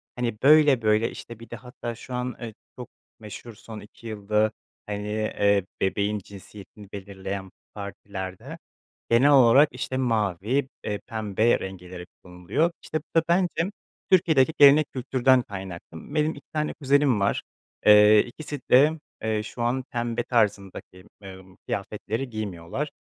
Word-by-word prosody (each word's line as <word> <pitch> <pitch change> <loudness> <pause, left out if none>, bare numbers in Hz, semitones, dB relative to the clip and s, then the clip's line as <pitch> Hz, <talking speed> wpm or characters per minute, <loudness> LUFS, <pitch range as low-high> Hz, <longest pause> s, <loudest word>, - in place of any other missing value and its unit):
Hani, 120 -3 -2
böyle 145 -3 +6
böyle, 110 +1 +2
işte, 115 -1 -10
bir 115 -1 -13
de - - -6
hatta 125 -2 -7
şu 125 +2 -10
an, 125 0 -3
eee, 115 -2 -6 0.3
çok 125 - -8 0.3
meşhur 110 +2 -10
son 110 +1 -10
2 105 +3 -13
yılda, 105 0 0 0.3
hani, 105 0 -5
eee, 100 -2 +1 0.2
bebeğin 100 +2 0
cinsiyetini 100 +1 -13
belirleyen 95 -1 -6 0.2
partilerde 100 -2 -7 0.5
genel 130 +5 +5
olarak, 135 +2 +6
işte, 130 +1 -4
mavi, 115 +1 0 0.2
eee, 105 -1 -3
pembe 110 -1 +1
renkleri 90 -1 -8 0.2
kullanılıyor. 90 - -1
İşte, - - -3
bu 165 +1 0
da - - -3
bence 175 +1 +1 0.4
Türkiye'deki 160 -6 +4
gelenek 145 +1 +7
kültürden 130 0 +2
kaynaklı. 95 - -9
Benim 155 +1 +2
2 145 -2 -13
tane 155 -1 -1
kuzenim 140 -4 +2
var, 100 - 0 0.4
eee, 105 0 +8
ikisi 145 +2 -7
de, 140 +5 +7 0.3
eee, 110 -1 -1
şu 120 - -8
an 125 +3 0
pembe 120 0 -2
tarzındaki, 100 -5 -2 0.2
eee, 95 -1 -10 0.3
kıyafetleri 110 +5 -4
giymiyorlar. 110 - -5
110 Hz, 140 wpm, -25 LUFS, 100-130 Hz, 0.5 s, eee